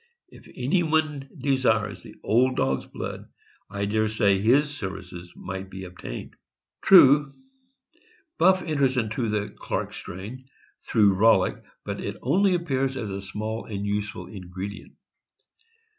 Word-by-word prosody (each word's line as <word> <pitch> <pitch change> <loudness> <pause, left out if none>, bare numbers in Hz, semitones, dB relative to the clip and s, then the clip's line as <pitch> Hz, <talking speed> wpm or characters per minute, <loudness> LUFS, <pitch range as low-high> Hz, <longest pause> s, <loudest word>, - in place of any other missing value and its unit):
If - - -16
anyone 155 0 0
desires 130 -6 +1
the - - -13
old 125 +4 +3
dog's 65 0 0
blood, - - -7 0.4
I 100 0 -2
dare 110 +1 +1
say 100 -3 +2
his 145 +7 +3
services 90 -4 -7
might 95 +1 -6
be 95 0 -8
obtained. 90 -9 -8 0.5
True, 145 -6 +7 1.0
Buff 185 +2 +5
enters 140 -5 +1
into 115 0 -1
the 105 -1 -1
Clark - - -4
strain, 115 +9 -8 0.4
through 105 -4 +4
Rollick, 110 +4 +3 0.2
but - - -4
it - - -5
only 185 +8 +3
appears 135 -6 -1
as 110 -5 -4
a 100 0 -4
small 110 +3 -5
and 100 -2 -4
useful 105 0 -3
ingredient. 95 +1 -8
110 Hz, 130 wpm, -25 LUFS, 100-135 Hz, 1.0 s, True